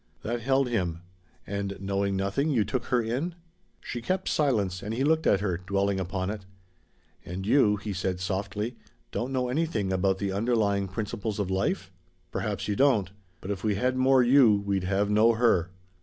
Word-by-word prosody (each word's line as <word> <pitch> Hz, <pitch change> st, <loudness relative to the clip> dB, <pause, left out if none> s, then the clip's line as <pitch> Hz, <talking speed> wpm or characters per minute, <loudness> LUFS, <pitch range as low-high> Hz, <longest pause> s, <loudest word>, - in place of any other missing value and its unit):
That 120 Hz, +1 st, -2 dB
held 135 Hz, +2 st, +2 dB
him. 90 Hz, -8 st, -2 dB, 0.4 s
"And 100 Hz, 0 st, -3 dB
knowing 100 Hz, 0 st, -1 dB
nothing, 100 Hz, +10 st, 0 dB
you 120 Hz, -8 st, +2 dB
took 115 Hz, +4 st, -2 dB
her 125 Hz, -2 st, +1 dB
in?" 135 Hz, +10 st, -2 dB, 0.5 s
She 120 Hz, -, -5 dB
kept 185 Hz, +10 st, -1 dB
silence, 105 Hz, -11 st, +1 dB
and 105 Hz, +2 st, -4 dB
he 130 Hz, -, 0 dB
looked 160 Hz, +2 st, +2 dB
at 100 Hz, -, +3 dB
her, 90 Hz, -5 st, -1 dB
dwelling 100 Hz, +1 st, 0 dB
upon 95 Hz, +1 st, -2 dB
it. 105 Hz, -2 st, -6 dB, 0.8 s
"And 95 Hz, +2 st, -6 dB
you," 110 Hz, -2 st, +4 dB
he 100 Hz, 0 st, -5 dB
said 95 Hz, -1 st, -2 dB
softly, 100 Hz, +5 st, -3 dB, 0.3 s
"don't 125 Hz, +3 st, -3 dB
know 130 Hz, -1 st, 0 dB
anything 125 Hz, -, -1 dB
about 95 Hz, +1 st, +1 dB
the 100 Hz, 0 st, -2 dB
'underlying 100 Hz, -2 st, +1 dB
principles 105 Hz, +2 st, -4 dB
of 100 Hz, -3 st, -2 dB
life'? 95 Hz, -1 st, -1 dB, 0.4 s
Perhaps -, -, -3 dB
you 105 Hz, -, 0 dB
don't. 115 Hz, -7 st, +3 dB, 0.3 s
But 95 Hz, -, -4 dB
if 95 Hz, -2 st, -4 dB
we 105 Hz, -2 st, +1 dB
had 125 Hz, +5 st, 0 dB
more 130 Hz, 0 st, +4 dB
you 120 Hz, -5 st, +5 dB
we'd 100 Hz, -2 st, 0 dB
have 100 Hz, +2 st, +1 dB
no 110 Hz, +3 st, +5 dB
her." 110 Hz, -7 st, +2 dB
105 Hz, 180 wpm, -27 LUFS, 95-120 Hz, 0.8 s, you